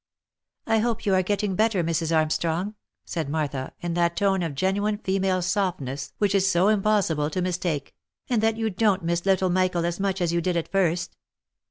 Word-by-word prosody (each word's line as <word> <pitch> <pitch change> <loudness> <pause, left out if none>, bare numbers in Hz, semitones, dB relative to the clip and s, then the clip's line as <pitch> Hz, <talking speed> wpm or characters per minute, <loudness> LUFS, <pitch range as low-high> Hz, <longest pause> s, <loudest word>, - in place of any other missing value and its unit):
" - - -61
I 225 -1 +2
hope 230 0 -1
you 200 - +2
are 185 - +4
getting 205 +1 -1
better, 215 -3 +2
Mrs. 165 0 -1
Armstrong?" 165 +5 0 0.3
said 160 -5 -3
Martha, 145 -4 -2
in 175 -1 -2
that 170 0 +1
tone 195 -2 +2
of 165 -5 -3
genuine 205 +6 0
female 190 -2 0
softness 170 -8 -2
which 205 -1 +1
it 200 - +4
is 190 0 +2
so 185 +2 +3
impossible 195 -8 +2
to 170 - -3
mis 180 -1 -1
take, 150 -6 -3 0.2
" - - -60
and 240 -4 +1
that 225 0 +1
you 225 -1 -1
don't 195 -1 +1
miss 170 +2 -1
little 190 -1 +3
Michael 180 -2 +1
as 175 +1 -2
much 195 -1 -1
as 170 -2 0
you 170 - +1
did 175 0 0
at 165 - -3
first." 175 -3 0
185 Hz, 210 wpm, -25 LUFS, 170-200 Hz, 0.3 s, are